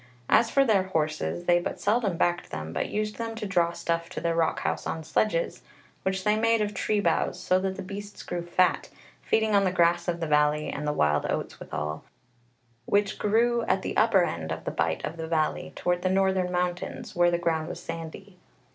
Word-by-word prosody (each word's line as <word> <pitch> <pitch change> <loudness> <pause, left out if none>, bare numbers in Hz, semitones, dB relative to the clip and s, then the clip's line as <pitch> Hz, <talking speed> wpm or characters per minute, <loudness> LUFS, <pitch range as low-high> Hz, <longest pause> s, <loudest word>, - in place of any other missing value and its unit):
As 230 - +5
for 275 +2 +4
their 215 -5 +4
horses, 160 0 -2
they 175 0 +4
but 175 - -4
seldom 205 -4 +1
backed 175 0 0
them, 80 +1 -6
but - - -2
used 210 0 -2
them 230 -1 -4
to 225 -1 -5
draw 175 -4 +2
stuff 170 0 -2
to - - -5
their 170 0 0
rock 165 -1 +1
house - - -2
on 160 - -3
sledges, 170 +1 0 0.4
which 190 0 -1
they 210 +1 +3
made 230 +1 +3
of 210 -1 -1
tree 210 0 0
boughs; 205 - +1
so 185 - +2
that 190 0 -2
the - - -6
beasts 205 +2 -8
grew 175 -1 -3
fat, 175 +1 +1 0.3
feeding 220 -1 +1
on 200 -1 +5
the 185 - +2
grass 170 -1 +2
of 170 -1 -1
the 165 - -1
valley 150 0 +2
and 150 +1 -4
the - - +2
wild 75 - +1
oats - - -3
withal, 75 +1 -4 0.8
which 205 0 +1
grew 235 +3 +2
at 190 - +1
the - - -3
upper 215 -4 +4
end 80 - -3
of 80 0 -4
the - - -1
bight - - -1
of 165 - -6
the 160 0 -4
valley, 160 -2 -1
toward 180 0 0
the 185 - +1
northern 190 -1 +2
mountains, 180 +1 -3
where 175 0 +4
the 170 - +1
ground 160 -2 -1
was - - -6
sandy. 165 +3 -8
180 Hz, 210 wpm, -27 LUFS, 165-205 Hz, 0.8 s, As